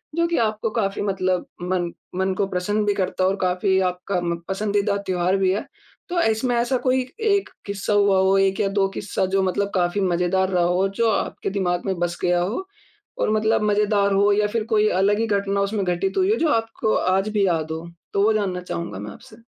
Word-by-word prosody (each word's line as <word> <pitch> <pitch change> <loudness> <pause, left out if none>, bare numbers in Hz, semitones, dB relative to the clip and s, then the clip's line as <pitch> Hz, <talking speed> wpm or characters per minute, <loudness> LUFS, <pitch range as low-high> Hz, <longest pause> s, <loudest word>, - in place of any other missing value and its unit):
जो 335 0 +2
कि 340 - -1
आपको 220 -1 0
काफ़ी 205 -3 -1
मतलब 185 -2 0 0.2
मन 175 -1 -1 0.2
मन 190 +1 0
को 200 - +2
प्रसन्न 200 +3 -1
भी 205 - +2
करता 185 -1 -1
है 185 - +4
और 195 - 0
काफ़ी 185 +1 +1
आपका 180 +1 -2
म 170 0 -1
पसंदीदा 200 +1 0
त्योहार 185 +1 +1
भी 190 -1 +2
है। 200 +3 -2 0.4
तो 350 -1 +1
इसमें 230 +1 +1
ऐसा 240 +2 +1
कोई 255 +1 +1 0.2
1 400 -3 +1 0.2
किस्सा 200 +1 -2
हुआ 200 -2 +4
हो, 190 +1 +3
1 195 0 +2
या 200 - +2
2 195 0 +1
किस्सा 195 -1 -2
जो 195 - +3
मतलब 200 +2 -1
काफ़ी 180 +2 +1
मजेदार 185 +1 +1
रहा 180 -2 +2
हो 180 +2 +2
जो 230 -1 +4
आपके 200 - -2
दिमाग 180 -2 -1
में 190 -1 0
बस 175 0 -1
गया 175 0 +2
हो 220 - -2 0.5
और - - 0
मतलब 220 +1 +2
मजेदार 205 -1 +2
हो 200 +1 +4
या 210 +1 +2
फिर 220 +1 -2
कोई 215 0 +4
अलग 205 +2 +2
ही 225 - 0
घटना 200 -1 0
उसमें 200 +1 -1
घटित 180 +2 -1
हुई 380 +2 +3
हो - - +4
जो 325 - +2
आपको 225 -1 -1
आज 190 +3 +1
भी 210 -2 +1
याद 160 -3 -1
हो? 160 +2 -5 0.3
तो 200 - +2
वो 220 - +4
जानना 195 -4 -1
चाहूँगा 170 - -5
मैं 105 +1 -7
आपसे। 215 - -14
195 Hz, 220 wpm, -22 LUFS, 185-215 Hz, 0.5 s, है